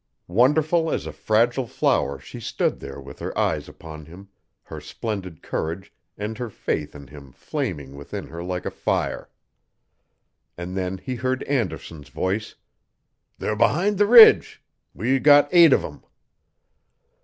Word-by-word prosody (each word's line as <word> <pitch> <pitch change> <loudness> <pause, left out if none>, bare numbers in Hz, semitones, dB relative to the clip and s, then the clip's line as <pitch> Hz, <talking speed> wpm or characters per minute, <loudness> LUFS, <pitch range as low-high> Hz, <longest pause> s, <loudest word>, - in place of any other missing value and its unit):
Wonderful 155 - +3
as - - -2
a - - -5
fragile 120 +4 +1
flower 70 -9 0
she 65 - -11
stood - - -2
there 70 0 -9
with 70 +1 -12
her - - -6
eyes - - -1
upon 80 -1 -11
him, 95 +4 -14 0.3
her - - -9
splendid 95 -7 -6
courage 85 +5 -4 0.2
and 105 +3 -5
her 120 -2 -4
faith 75 -7 -4
in 70 -1 -10
him 70 -2 -13
flaming 70 +1 -5
within 70 0 -7
her 85 +1 -9
like 90 0 -4
a - - -3
fire. - - -2 1.3
And 90 +1 -6
then 95 0 -3
he 130 - -6
heard 130 +1 -2
Anderson's 95 - -4
voice: 100 +4 -3 0.8
"They're 105 - -2
behind 190 - +1
the 205 - +4
ridge. 230 0 +7 0.3
We 130 +7 0
got 145 +1 +6
eight 170 -2 +7
of - - +3
them." - - -9
100 Hz, 145 wpm, -23 LUFS, 80-130 Hz, 1.3 s, ridge